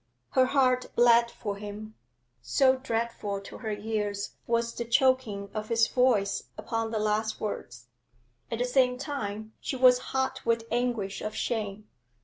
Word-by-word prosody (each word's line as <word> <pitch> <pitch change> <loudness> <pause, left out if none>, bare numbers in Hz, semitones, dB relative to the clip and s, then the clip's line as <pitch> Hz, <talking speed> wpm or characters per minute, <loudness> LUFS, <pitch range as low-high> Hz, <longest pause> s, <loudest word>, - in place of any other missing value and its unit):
Her 255 -1 +4
heart 255 -2 +2
bled 235 0 +5
for 205 -4 -5
him, 210 +1 -8 0.5
so 265 -2 +3
dreadful 230 -5 -2
to 195 - -10
her 220 - -4
ears 205 -1 -2 0.2
was 235 0 +1
the 235 - -3
choking 235 -5 +1
of 215 0 -4
his 230 0 +4
voice 250 -6 +2
upon 225 -1 -2
the 220 - -2
last 215 +1 0
words. 120 - -5 0.6
At 230 - -2
the 245 - 0
same 250 0 +3
time 220 -6 -5
she - - -3
was 250 -1 +6
hot 265 0 -1
with 230 -1 +1
anguish 235 -5 -1
of 215 0 -4
shame. 215 -2 -3
230 Hz, 150 wpm, -28 LUFS, 210-250 Hz, 0.6 s, was